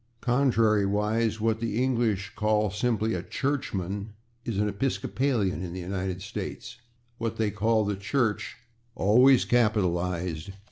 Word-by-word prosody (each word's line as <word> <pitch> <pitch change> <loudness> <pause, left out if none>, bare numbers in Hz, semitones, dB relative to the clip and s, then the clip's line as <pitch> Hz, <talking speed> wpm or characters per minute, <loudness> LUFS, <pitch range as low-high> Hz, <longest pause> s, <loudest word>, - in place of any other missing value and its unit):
Contrariwise, 110 -3 +2
what 110 0 +1
the 115 -2 -2
English 115 -7 0
call 105 -1 +1
simply 110 +1 0
a 90 - -2
/churchman/ 100 -5 -2 0.4
is 115 -4 -3
an 105 +1 +1
/Episcopalian/ 115 -1 -1
in 85 -2 -5
the 95 - -5
United 95 0 -3
States, 110 +3 -6 0.4
what 115 -1 -3
they 110 -2 +1
call 110 +2 +1
the 105 0 -1
/Church/ 110 +3 -1 0.4
(always 125 +6 +5
capitalized!) 90 -6 0
105 Hz, 125 wpm, -27 LUFS, 100-115 Hz, 0.4 s, always